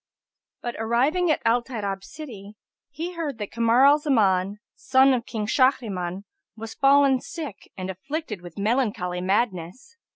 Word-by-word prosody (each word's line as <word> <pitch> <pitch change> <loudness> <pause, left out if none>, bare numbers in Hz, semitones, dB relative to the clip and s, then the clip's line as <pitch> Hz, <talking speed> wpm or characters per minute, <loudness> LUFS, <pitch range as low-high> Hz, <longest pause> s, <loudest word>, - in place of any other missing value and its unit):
But 240 -1 -4
arriving 265 +11 +1
at 310 - +1
Al 235 +1 +3
Tayrab 200 -6 -4
city, 215 -7 -10 0.3
he 325 +5 -5
heard 310 -7 -4
that 210 -2 -6
Kamar 235 +3 +4
al 290 +2 +6
Zaman, 205 -9 +2 0.2
son 265 +1 +4
of 240 -2 -2
King 215 -3 -3
Shahriman, 205 -7 0 0.3
was 225 0 -7
fallen 275 -1 +4
sick 300 - -8
and 185 -1 -4
afflicted 230 - -5
with 175 -2 -12
melancholy 205 -5 0
madness. 195 - -2
235 Hz, 140 wpm, -24 LUFS, 200-275 Hz, 0.3 s, al